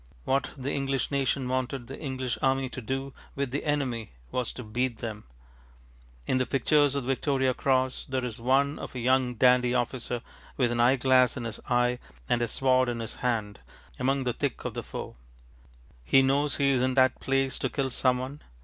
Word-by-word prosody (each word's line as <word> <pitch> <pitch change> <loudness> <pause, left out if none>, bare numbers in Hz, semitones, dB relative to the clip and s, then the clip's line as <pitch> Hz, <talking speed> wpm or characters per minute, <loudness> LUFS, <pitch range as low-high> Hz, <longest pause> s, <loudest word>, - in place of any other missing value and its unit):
What 135 +1 +1
the 135 +1 -3
English 135 -1 -1
nation 135 -1 0
wanted 130 0 -2
the 135 - -9
English 130 -4 -3
army 135 0 +1
to 125 - -7
do 135 +3 -3 0.2
with 140 -2 -2
the 140 - -2
enemy 130 - -1 0.2
was 125 -2 -1
to 125 - -7
ŌĆ£beat 120 +3 -1
ŌĆÖem.ŌĆØ 110 -2 -6 1.0
In 130 - +1
the 130 - 0
pictures 145 +1 +3
of 140 - -1
the 125 - -5
Victoria 135 -1 +1
Cross 130 0 0
there 130 -1 -1
is 120 -1 -5
one 135 +4 +2
of - - -8
a - - -3
young 125 0 +2
dandy 125 +1 +4
officer 120 -1 -2 0.3
with 125 -3 +2
an 120 - -1
eyeglass 130 0 +4
in 125 - -4
his 115 -2 -5
eye 125 0 +2 0.3
and 120 - +1
a 120 - +1
sword 130 +1 +2
in 120 -1 -3
his 115 -1 -5
hand, 110 -5 -1 0.4
among 135 +1 +1
the 125 -1 0
thick - - -3
of - - -3
the - - -3
foe. - - -7 0.9
He 135 - +5
knows 140 +2 +2
he 140 -1 +3
is 130 -2 +2
in 130 0 +1
that 130 -1 +4
place 135 0 0
to 130 - -1
kill 135 -1 -2
some 125 0 +2
one. 130 +4 -6
130 Hz, 195 wpm, -28 LUFS, 125-135 Hz, 1.0 s, He